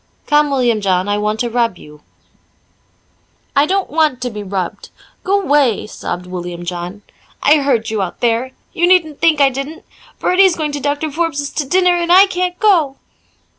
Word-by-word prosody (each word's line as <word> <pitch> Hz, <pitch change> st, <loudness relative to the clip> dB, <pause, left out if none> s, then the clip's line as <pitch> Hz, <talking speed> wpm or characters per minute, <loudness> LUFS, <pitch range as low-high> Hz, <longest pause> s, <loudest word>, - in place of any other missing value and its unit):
"Come, 295 Hz, 0 st, +3 dB
William 245 Hz, -5 st, +1 dB
John, 185 Hz, -1 st, 0 dB
I 205 Hz, 0 st, 0 dB
want 210 Hz, +1 st, -1 dB
to 240 Hz, -, -1 dB
rub 230 Hz, -5 st, 0 dB
you." 150 Hz, -2 st, -15 dB, 1.5 s
"I 285 Hz, +2 st, +4 dB
don't 390 Hz, +2 st, -1 dB
want 305 Hz, -4 st, +1 dB
to 245 Hz, -, -3 dB
be 210 Hz, -1 st, -6 dB
rubbed 190 Hz, -3 st, -5 dB, 0.3 s
g'way," 295 Hz, -, +1 dB
sobbed 180 Hz, -4 st, -6 dB
William 175 Hz, -1 st, -6 dB
John. 180 Hz, +3 st, -6 dB, 0.4 s
"I 300 Hz, +2 st, +5 dB
heard 265 Hz, -7 st, 0 dB
you 215 Hz, -2 st, -1 dB
out 185 Hz, -2 st, -5 dB
there 240 Hz, +2 st, 0 dB, 0.2 s
you 345 Hz, -2 st, +2 dB
needn't 330 Hz, -5 st, +2 dB
think 320 Hz, -3 st, +3 dB
I 280 Hz, -1 st, +5 dB
didn't. 275 Hz, +5 st, -7 dB, 0.3 s
Bertie's 370 Hz, -1 st, +3 dB
going 305 Hz, -2 st, -2 dB
to 290 Hz, -, -4 dB
Doctor 290 Hz, +2 st, -2 dB
Forbes's 300 Hz, -2 st, -2 dB
to 290 Hz, -, -3 dB
dinner 360 Hz, +2 st, +3 dB
and 345 Hz, 0 st, -1 dB
I 375 Hz, +2 st, +8 dB
can't 360 Hz, -2 st, -2 dB
go." 335 Hz, -11 st, +3 dB
280 Hz, 170 wpm, -16 LUFS, 210-330 Hz, 1.5 s, I